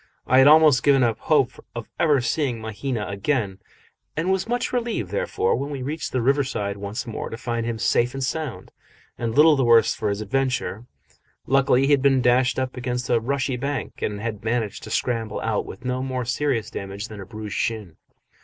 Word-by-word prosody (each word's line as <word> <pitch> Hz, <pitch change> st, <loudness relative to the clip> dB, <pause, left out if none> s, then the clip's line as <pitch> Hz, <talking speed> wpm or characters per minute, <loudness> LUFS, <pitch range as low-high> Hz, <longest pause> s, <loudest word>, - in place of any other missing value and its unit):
I 130 Hz, -, +4 dB
had 135 Hz, -, +7 dB
almost 150 Hz, -3 st, +7 dB
given 135 Hz, -2 st, +4 dB
up 115 Hz, -2 st, +1 dB
hope 135 Hz, -5 st, +1 dB
of 120 Hz, -1 st, -5 dB
ever 150 Hz, -5 st, +3 dB
seeing 120 Hz, 0 st, -1 dB
Mahina 110 Hz, +1 st, -3 dB
again, 100 Hz, 0 st, -1 dB, 0.6 s
and 170 Hz, +4 st, +1 dB
was 190 Hz, +3 st, -1 dB
much 245 Hz, +1 st, -1 dB
relieved, 230 Hz, -, -2 dB
therefore, 100 Hz, -2 st, 0 dB
when 140 Hz, +3 st, -3 dB
we 140 Hz, -3 st, -5 dB
reached 150 Hz, +2 st, -4 dB
the 125 Hz, -2 st, 0 dB
river 140 Hz, +3 st, +3 dB
side 100 Hz, -6 st, -3 dB
once 100 Hz, +6 st, -5 dB
more, 115 Hz, -, -5 dB
to 115 Hz, -, -6 dB
find 115 Hz, -1 st, -3 dB
him 115 Hz, -1 st, -2 dB
safe 120 Hz, +3 st, +1 dB
and 135 Hz, -, -3 dB
sound, 150 Hz, 0 st, -4 dB, 0.4 s
and 115 Hz, -1 st, -3 dB
little 155 Hz, +1 st, +7 dB
the 135 Hz, -, +1 dB
worse 115 Hz, -1 st, +5 dB
for 110 Hz, -2 st, -2 dB
his 100 Hz, 0 st, -2 dB
adventure. 120 Hz, -2 st, -2 dB, 0.6 s
Luckily 135 Hz, 0 st, +3 dB
he 140 Hz, -, +1 dB
had 140 Hz, -2 st, +4 dB
been 135 Hz, -1 st, +4 dB
dashed 125 Hz, 0 st, +3 dB
up 130 Hz, -1 st, -2 dB
against 125 Hz, 0 st, -3 dB
a 120 Hz, -, +4 dB
rushy 130 Hz, +2 st, -1 dB
bank, 140 Hz, 0 st, -4 dB
and 105 Hz, -1 st, -2 dB
had 105 Hz, -2 st, -5 dB
managed 115 Hz, -2 st, -1 dB
to -, -, -8 dB
scramble 115 Hz, -4 st, -1 dB
out 110 Hz, -2 st, -1 dB
with 125 Hz, -, -10 dB
no 125 Hz, 0 st, -1 dB
more 130 Hz, -1 st, -3 dB
serious 125 Hz, -1 st, -1 dB
damage 100 Hz, +2 st, -6 dB
than 105 Hz, -3 st, -9 dB
a -, -, -8 dB
bruised 110 Hz, -1 st, -7 dB
shin. 105 Hz, -8 st, -3 dB
125 Hz, 200 wpm, -23 LUFS, 110-135 Hz, 0.6 s, had